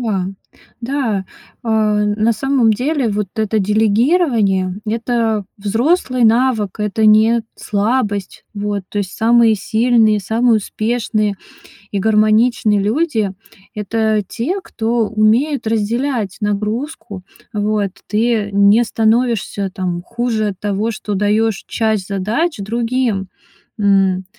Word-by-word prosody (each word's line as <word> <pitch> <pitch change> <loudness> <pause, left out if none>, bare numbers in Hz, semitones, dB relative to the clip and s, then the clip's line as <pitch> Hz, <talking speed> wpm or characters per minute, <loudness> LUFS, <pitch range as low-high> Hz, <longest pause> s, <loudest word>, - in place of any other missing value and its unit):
Да. 200 -6 -1 0.5
Да, 230 -6 -1 0.4
а 220 -2 +1
на 215 +2 +1
самом 260 -3 +2
деле, 265 +2 -1
вот 205 -2 -2
это 220 0 0
делегирование- 215 - +2
это 225 -2 -1
взрослый 245 - +1
навык, 225 -3 +2
это 210 +1 +1
не 220 +2 +5
слабость. 205 -2 -2
Вот. 205 -1 -3
То 205 - -4
есть 190 -2 -3
самые 230 0 +4
сильные, 220 +1 +2
самые 225 +4 +2
успешные 215 -1 -1 0.5
и 200 - -2
гармоничные 215 0 +3
люди- 220 - 0 0.4
это 215 0 0
те, 310 +12 -3
кто 230 -7 -1
умеет 225 +6 +1
разделять 225 -1 -1
нагрузку. 210 - -3 0.3
Вот. 210 -1 0 0.2
Ты 220 -1 0
не 200 +4 +4
становишься 220 -3 0
там 180 -2 -3
хуже 230 -1 -2
от 190 -2 -7
того, 205 +2 -1
что 210 -1 -4
даёшь 210 +1 0
часть 220 -4 -1
задач 220 - -1
другим. 230 -1 -1 0.5
М, 195 -2 +2
220 Hz, 110 wpm, -17 LUFS, 205-235 Hz, 0.5 s, не